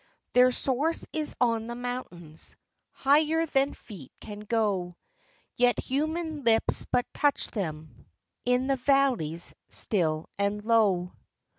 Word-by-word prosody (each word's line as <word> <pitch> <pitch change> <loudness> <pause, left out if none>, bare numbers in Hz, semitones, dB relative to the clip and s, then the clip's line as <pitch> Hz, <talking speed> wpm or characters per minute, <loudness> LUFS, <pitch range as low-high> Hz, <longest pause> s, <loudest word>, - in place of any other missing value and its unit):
Their 250 0 +6
source 280 +6 0
is 310 -1 -3
on 230 -2 +1
the 235 - -5
mountains, 240 -11 -4 0.3
Higher 310 +4 +2
than 275 -2 +1
feet 175 - -12
can 205 -1 -9
go; 205 -5 -1 0.6
Yet 245 0 +3
human 310 +2 -2
lips 225 -1 +2
but 245 - +2
touch 290 -1 +1
thenv 160 -7 -4 0.6
In 250 +1 +2
the 270 0 +1
valleys, 255 - +1
still 160 -6 0
and 205 +1 -1
low. 200 -6 +2
240 Hz, 120 wpm, -28 LUFS, 195-275 Hz, 0.6 s, Their